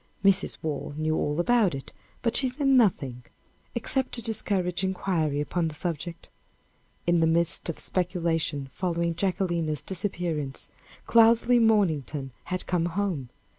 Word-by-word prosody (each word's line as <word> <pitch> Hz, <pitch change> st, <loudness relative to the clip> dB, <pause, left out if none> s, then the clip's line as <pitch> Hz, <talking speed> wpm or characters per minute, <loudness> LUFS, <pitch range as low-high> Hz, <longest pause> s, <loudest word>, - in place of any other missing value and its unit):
Mrs. 195 Hz, -1 st, +3 dB
Waugh 145 Hz, -2 st, -3 dB
knew 155 Hz, 0 st, 0 dB
all 150 Hz, +1 st, -1 dB
about 210 Hz, -, +3 dB
it, 135 Hz, -, -8 dB, 0.3 s
but 230 Hz, -, 0 dB
she 265 Hz, -, +4 dB
said 275 Hz, +3 st, -4 dB
nothing, 175 Hz, -, +3 dB, 0.5 s
except 260 Hz, +2 st, -1 dB
to 235 Hz, -, -1 dB
discourage 195 Hz, -5 st, 0 dB
inquiry 180 Hz, -6 st, 0 dB
upon 165 Hz, +3 st, -1 dB
the 155 Hz, -, -6 dB
subject. 170 Hz, +1 st, -4 dB, 0.8 s
In 175 Hz, 0 st, +3 dB
the 165 Hz, -, +3 dB
midst 170 Hz, +1 st, +1 dB
of 165 Hz, -, -2 dB
the -, -, -6 dB
speculation 170 Hz, -6 st, 0 dB
following 170 Hz, -2 st, -1 dB
Jacquelina's 170 Hz, -5 st, -1 dB
disappearance, 170 Hz, -6 st, -3 dB, 0.4 s
Cloudesley 230 Hz, +1 st, +5 dB
Mornington 160 Hz, -, +1 dB
had 185 Hz, 0 st, -3 dB
come 175 Hz, -2 st, 0 dB
home. 175 Hz, -8 st, -2 dB
175 Hz, 135 wpm, -27 LUFS, 155-200 Hz, 0.8 s, Cloudesley